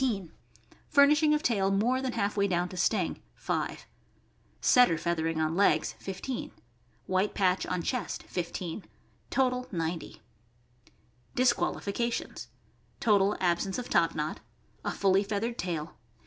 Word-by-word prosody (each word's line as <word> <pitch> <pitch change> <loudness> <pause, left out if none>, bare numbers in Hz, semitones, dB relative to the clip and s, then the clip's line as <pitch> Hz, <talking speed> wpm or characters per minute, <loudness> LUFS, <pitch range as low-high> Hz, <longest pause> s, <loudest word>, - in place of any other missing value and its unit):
.100 205 -10 0 0.6
Furnishing 300 +1 +5
of 300 0 +2
tail 200 -7 +2
more 230 +7 +2
than 260 -2 -2
half 200 +1 -1
way 200 -1 +2
down 180 -1 0
to 185 - -9
sting 180 0 0
5 - - -3 0.7
Setter 245 -10 +5
feathering 165 -1 -1
on 155 0 +1
legs 160 -5 +3
15 195 +7 -5 0.5
White 190 +2 0
patch 185 -2 +2
on 180 -2 -2
chest 250 +5 -3
15 175 +1 -5 0.4
Total.. 255 -1 +1
.90 165 -4 -4 1.2
DISQUALIFICATIONS. 235 -2 0 0.5
Total 205 -2 +3
absence 185 +2 0
of 250 - -5
top 165 -1 +3
knot. 155 0 -3 0.4
A - - -1
fully 195 0 +3
feathered 215 +3 -2
tail. 170 -3 -3
195 Hz, 125 wpm, -29 LUFS, 175-240 Hz, 1.2 s, Furnishing